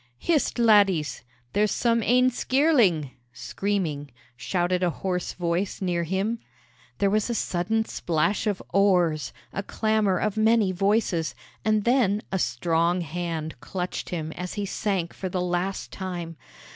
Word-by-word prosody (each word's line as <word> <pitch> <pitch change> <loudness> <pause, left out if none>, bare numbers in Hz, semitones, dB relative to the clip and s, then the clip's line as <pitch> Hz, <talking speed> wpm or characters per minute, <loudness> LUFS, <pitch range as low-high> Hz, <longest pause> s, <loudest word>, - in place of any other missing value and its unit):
"Hist, 305 - +1
laddies! 200 - +3 0.3
there's 210 +1 +3
some 230 +1 +1
ane 250 +3 +4
skirling" 240 - +2 0.2
(screaming), 145 - -2 0.3
shouted 180 +6 0
a 180 - +2
hoarse 180 +1 -3
voice 175 +2 -2
near 175 -3 -1
him. 195 +7 -1 0.6
There 200 -1 +2
was 215 +2 +1
a 235 - -1
sudden 220 +3 0
splash 175 +6 0
of 205 -2 -1
oars, 175 -7 +3 0.2
a 195 - -2
clamor 215 -2 +1
of 210 +3 -1
many 220 -2 +4
voices, 195 -3 +1 0.3
and 215 -1 +2
then 225 -4 +2
a 190 - 0
strong 170 +7 +1
hand 165 -3 -4
clutched 180 +4 -4
him 160 -3 -3
as 180 +2 -6
he 205 -1 -2
sank 190 -3 -2
for 190 - -5
the 185 - -2
last 180 +2 -2
time. 175 -3 -5
190 Hz, 140 wpm, -25 LUFS, 170-215 Hz, 0.6 s, ane